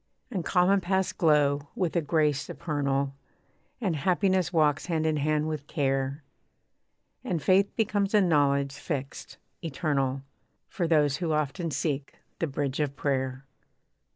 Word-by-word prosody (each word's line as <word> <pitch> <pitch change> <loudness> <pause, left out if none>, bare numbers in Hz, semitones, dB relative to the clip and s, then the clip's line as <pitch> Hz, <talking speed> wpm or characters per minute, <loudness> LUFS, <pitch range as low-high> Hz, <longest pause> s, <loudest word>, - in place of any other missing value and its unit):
And 185 -4 -2
common 185 +3 +3
paths 190 +1 0
glow 145 -4 +2
with 180 -3 -1
a 170 - +3
grace 150 -2 +1
supernal, 140 -3 -2 0.7
And 195 -9 0
happiness 185 +2 +1
walks 155 -3 +2
hand 160 -3 0
in 155 -1 +1
hand 150 +1 +1
with 150 -2 -4
care, 135 0 -1 1.0
And 170 - -1
faith 190 +6 +3
becomes 210 -2 +1
a - - +7
knowledge 140 -5 +2
fixed, 140 -1 -5 0.2
eternal, 135 -4 -1 0.4
For 175 -6 -2
those 150 -4 +3
who 170 -3 -1
often 150 +2 -1
seek 145 -1 -2 0.2
the 165 - 0
bridge 140 -1 -2
of 145 -2 -1
prayer. 130 -1 -2
150 Hz, 135 wpm, -28 LUFS, 140-175 Hz, 1.0 s, a